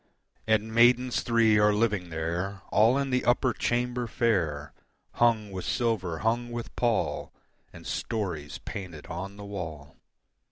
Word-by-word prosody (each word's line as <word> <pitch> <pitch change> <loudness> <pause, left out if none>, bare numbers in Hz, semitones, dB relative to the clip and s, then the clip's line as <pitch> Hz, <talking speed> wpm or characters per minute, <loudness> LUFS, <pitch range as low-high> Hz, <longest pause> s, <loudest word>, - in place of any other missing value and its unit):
And 110 0 +1
maidens 120 +2 +4
three 115 -2 +3
are 105 0 +4
living 105 -5 0
there 85 +5 -3
All 115 +5 +5
in 140 -1 -1
the 125 0 +1
upper 125 0 +2
chamber 120 +1 -1
fair, 85 - 0 0.5
Hung 110 -4 +3
with 95 -1 -5
silver, 105 -9 -1
hung 120 +2 +1
with 120 -1 -6
pall, 120 -3 0 0.4
And - - -13
stories 85 -9 -3
painted 90 -8 -7
on 95 +4 -6
the 100 - -8
wall. 80 -8 -7
105 Hz, 135 wpm, -28 LUFS, 90-120 Hz, 0.5 s, All